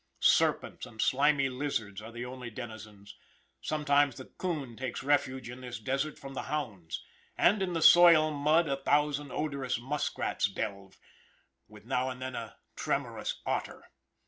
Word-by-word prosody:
Serpents - - +2
and 110 - -16
slimy 140 +3 +3
lizards 125 -7 -3
are 110 +2 -9
the 120 +1 -6
only 125 -1 -7
denizens; 110 -3 -9 0.5
sometimes 145 -3 +2
the 130 - -8
coon 150 -10 -4
takes 130 +1 -4
refuge 130 -2 +1
in 125 +1 -8
this 125 -5 -6
desert 135 +7 -2
from 135 0 -9
the - - -3
hounds, 95 - -4 0.3
and 200 +3 +4
in 185 -2 -1
the 165 -2 0
soil 170 -3 +8
mud 155 +3 +3
a 135 -1 0
thousand 145 +1 +1
odorous 140 -5 -2
muskrats 135 -5 -1
delve, 100 -1 -5 0.7
with 105 0 -15
now 130 +1 0
and 130 -1 -6
then 130 0 -5
a 115 -2 -6 0.2
tremorous - - -2
otter. - - -3
130 Hz, 150 wpm, -30 LUFS, 115-145 Hz, 0.7 s, soil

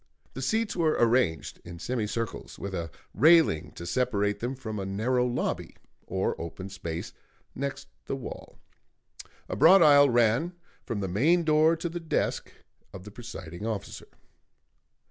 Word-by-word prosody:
The 135 - -6
seats 215 - 0
were 160 -3 +2
arranged 115 - +1
in 85 0 -9
semicircles, 115 +2 -4
with 100 -1 -6
a 85 -3 -3 0.2
railing 160 - +4
to 85 - -8
separate 105 0 0
them 125 +3 -3
from 110 -5 -6
a - - -3
narrow 125 +6 +1
lobby 120 0 -3 0.3
or - - -1
open 95 +3 -7
space 85 -4 -6 0.4
next 140 +1 -4 0.2
the - - -2
wall; 135 - -9 0.9
a - - -4
broad 175 - +7
aisle 145 -2 +7
ran 120 +8 +2 0.3
from 110 -3 -2
the 95 - -2
main 150 - +3
door 155 +1 +4
to 165 +1 -4
the 170 +1 -5
desk 165 -3 -2 0.4
of 95 -1 -10
the 105 - -10
presiding 100 -4 -8
officer. 105 -3 -5
120 Hz, 145 wpm, -28 LUFS, 95-145 Hz, 0.9 s, broad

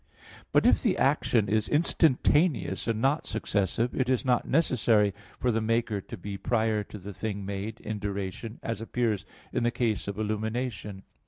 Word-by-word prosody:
But - - +4
if - - +5
the - - +1
action 110 -3 +2
is 110 +1 +1
instantaneous 150 - +2
and 115 -2 0
not 140 +4 +2
successive, 110 +2 0
it 130 -1 0
is 130 +1 +1
not 125 -2 +2
necessary 115 - +3 0.3
for 125 - +2
the 115 0 0
maker 115 -2 0
to 115 - -9
be 100 +1 -6
prior 110 -3 +1
to 105 - -9
the 100 +1 -8
thing 100 -1 -4
made 100 +3 -4
in 105 -1 -4
duration 100 +3 -4
as 115 -1 -3
appears 110 -4 -1 0.3
in - - 0
the 120 - +3
case 115 -4 -1
of 100 -1 -4
illumination. 110 -1 -3
110 Hz, 170 wpm, -28 LUFS, 100-120 Hz, 0.3 s, if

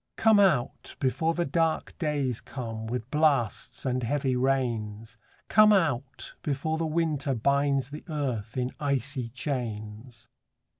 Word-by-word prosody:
Come 220 -2 +5
out, 150 -12 +1
before 160 +5 +1
the 175 - 0
dark 165 +2 0
days 145 -7 -1
come, 115 -4 -6
With 125 +1 -4
blasts 145 -9 +1
and 130 -1 0
heavy 135 +1 0
rains: 115 -4 -1 0.3
Come 215 0 +6
out, 140 - 0
before 155 +3 -1
the 165 - 0
winter 155 -4 0
binds 140 +2 +1
The 150 - -7
earth 130 -8 -3
in 125 0 -1
icy 140 -3 -1
chains. 115 -3 -5
135 Hz, 130 wpm, -28 LUFS, 120-150 Hz, 0.3 s, Come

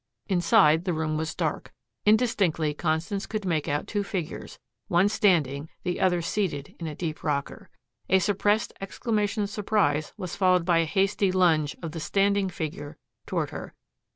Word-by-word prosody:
Inside 170 -3 +4
the 180 - 0
room 155 -1 -1
was 160 +1 -3
dark. - - -2 0.4
Indistinctly 200 -9 +2
Constance 165 +5 -2
could 215 -2 -4
make 160 -5 0
out 145 +1 -1
two 205 - -2
figures, 180 -5 -5 0.3
one 175 +3 +4
standing, 160 -8 +1
the 180 - -2
other 180 -2 +2
seated 165 -6 -2
in 165 - -4
a 150 - -5
deep 160 -2 -5
rocker. 140 -2 -3 0.4
A 190 - +6
suppressed 205 +2 +1
exclamation 210 +1 -1
of 200 - -4
surprise 200 -9 +1
was 180 -2 -5
followed 185 -3 +3
by 170 -2 +3
a 165 - +2
hasty 195 +2 +1
lunge 165 -5 +2
of 165 - -4
the 165 - -6
standing 200 +3 +1
figure 150 -3 -6 0.3
toward - - -1
her. - - -8
175 Hz, 160 wpm, -26 LUFS, 155-200 Hz, 0.4 s, A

